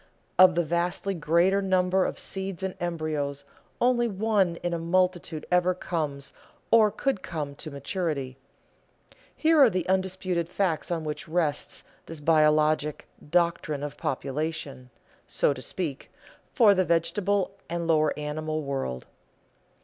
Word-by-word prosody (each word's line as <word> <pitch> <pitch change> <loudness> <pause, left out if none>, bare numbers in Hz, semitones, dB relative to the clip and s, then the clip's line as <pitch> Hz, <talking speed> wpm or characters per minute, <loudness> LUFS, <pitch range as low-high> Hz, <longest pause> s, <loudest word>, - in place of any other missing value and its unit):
Of 185 -2 +8
the 175 - +2
vastly 175 +4 -1
greater 170 +4 +2
number 185 -1 +2
of - - -3
seeds 190 -1 -3
and 190 -1 -2
embryos, 155 -5 -2 0.4
only 240 -1 +3
one 200 -4 +1
in 175 0 -1
a 170 - -1
multitude 175 -2 0
ever 180 0 +3
comes 150 -6 -3 0.4
or 220 -2 +6
could 235 -1 -1
come 150 -5 -4
to 155 - -5
maturity. 140 -2 -3 1.0
Here 320 -1 +4
are 265 - +8
the 185 -3 -2
undisputed 185 -2 0
facts 180 -4 -1
on 170 -2 -2
which 150 -1 -5
rests 155 -3 -1 0.2
a 165 -2 -7
biologic 155 -1 +2 0.2
"doctrine 170 -4 +1
of 145 0 -5
population," 145 -2 -4 0.4
so - - +2
to 130 - -9
speak, 150 -2 -4 0.4
for 220 -5 +6
the 185 -1 +2
vegetable 185 +4 +1 0.2
and 170 0 -2
lower 155 -2 +2
animal 155 +1 -3
world. 135 - -3
170 Hz, 135 wpm, -27 LUFS, 150-185 Hz, 1.0 s, Of